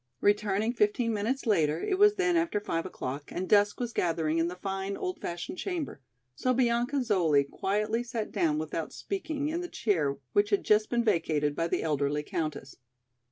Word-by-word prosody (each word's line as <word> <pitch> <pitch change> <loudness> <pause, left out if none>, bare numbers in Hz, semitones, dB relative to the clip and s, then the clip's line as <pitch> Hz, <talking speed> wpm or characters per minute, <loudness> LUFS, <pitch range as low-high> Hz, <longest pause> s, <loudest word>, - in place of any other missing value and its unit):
" 125 - -48
Returning 205 +2 +2
fifteen 230 +1 +1
minutes 230 +7 -1
later, 160 -8 +2
it 375 - -1
was 415 0 +6
then 370 -3 +2
after 330 -10 +1
five 165 -4 -2
o'clock 140 -4 -6
and 185 +1 -3
dusk 205 -1 +4
was 240 -2 -3
gathering 165 -2 0
in 165 - +2
the 180 - -5
fine, 195 +1 -3
old 365 -1 -4
fashioned 175 - -5
chamber, 340 - -4 0.3
so 255 - 0
Bianca 245 +2 +2
Zoli 170 -11 +3
quietly 210 +8 -1
sat 235 -3 -4
down 165 -7 +1
without 155 +1 -3
speaking 315 -7 -3
in 335 +3 -2
the 355 - -4
chair 155 -11 0 0.2
which 205 0 +3
had 200 -2 +2
just 215 0 +3
been 235 -1 +1
vacated 155 -8 +1
by 165 +2 0
the - - -1
elderly 150 -1 0
countess. 155 -3 -4
205 Hz, 185 wpm, -29 LUFS, 165-240 Hz, 0.3 s, was